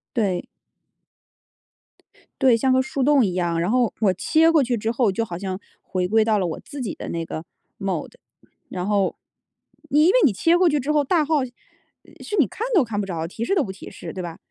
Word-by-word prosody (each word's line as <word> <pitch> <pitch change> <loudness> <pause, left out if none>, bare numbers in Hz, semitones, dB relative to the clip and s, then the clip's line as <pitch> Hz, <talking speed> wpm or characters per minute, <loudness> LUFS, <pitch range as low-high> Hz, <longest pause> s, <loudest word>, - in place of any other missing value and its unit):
对。 195 -6 0 1.9
对， 255 -4 +5
像 260 +3 +2
个 260 - +4
树 265 +1 -3
洞 275 -2 +4
一 185 - -2
样， 175 -2 0
然 175 +5 0
后 245 -2 +2
我 200 -4 +3
切 320 - +3
过 320 -2 +4
去 245 -1 0
之 225 0 -1
后， 235 -3 +2
就 230 +4 -1
好 180 -6 -6
像 190 0 -4 0.2
回 180 -1 -2
归 220 +3 +3
到 220 -1 +2
了 190 - 0
我 165 - -4
自 285 - -8
己 220 -7 -3
的 - - -8
那 165 -1 -3
个 160 0 -6 0.3
Mode。 195 - -3 0.5
然 180 -1 -4
后 200 -2 +1 0.7
因 300 +3 +4
为 370 - +4
你 250 - +3
切 330 - +3
过 365 0 +4
去 295 -1 +1
之 280 +3 -1
后 300 -1 +3
大 315 +3 +2
号 295 -3 +1
是 255 +10 -12
你 300 - +6
看 455 - -4
都 340 - +6
看 220 -4 -3
不 205 - -1
着， 165 -3 -3
提 220 +6 -5
示 395 - +1
都 350 - +3
不 195 - -5
提 190 - -10
示， - - -8
对 185 - -6
吧？ 170 -2 -7
225 Hz, 250 characters per minute, -23 LUFS, 185-280 Hz, 1.9 s, 你